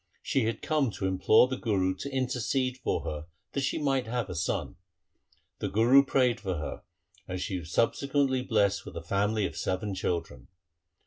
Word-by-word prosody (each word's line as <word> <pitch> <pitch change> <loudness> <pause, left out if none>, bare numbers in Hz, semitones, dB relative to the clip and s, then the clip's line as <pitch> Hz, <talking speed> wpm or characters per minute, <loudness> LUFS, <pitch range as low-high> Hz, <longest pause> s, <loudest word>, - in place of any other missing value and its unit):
She 135 -4 +1
had 115 - -2
come 150 -5 +1
to 95 - -4
implore 95 +5 +5
the 130 0 -3
Guru 95 -6 +1
to 140 - -5
intercede 130 0 -1
for - - -1
her 75 -1 -5 0.2
that 140 - -1
she 135 - 0
might 135 -5 0
have 115 -4 -2
a - - -5
son. 85 +3 -2 0.8
The - - -2
Guru 120 +6 +6
prayed 130 -4 +2
for 95 -3 -2
her 75 - -5 0.5
and 90 0 -4
she 95 0 -2
was 80 0 -10
sub 115 - +3
sequently 140 -2 +1
blessed 100 -5 +1
with - - -9
a 85 - -6
family 100 +4 +1
of - - -4
seven 95 +2 -2
children. 85 -9 -3
110 Hz, 185 wpm, -29 LUFS, 95-130 Hz, 0.8 s, Guru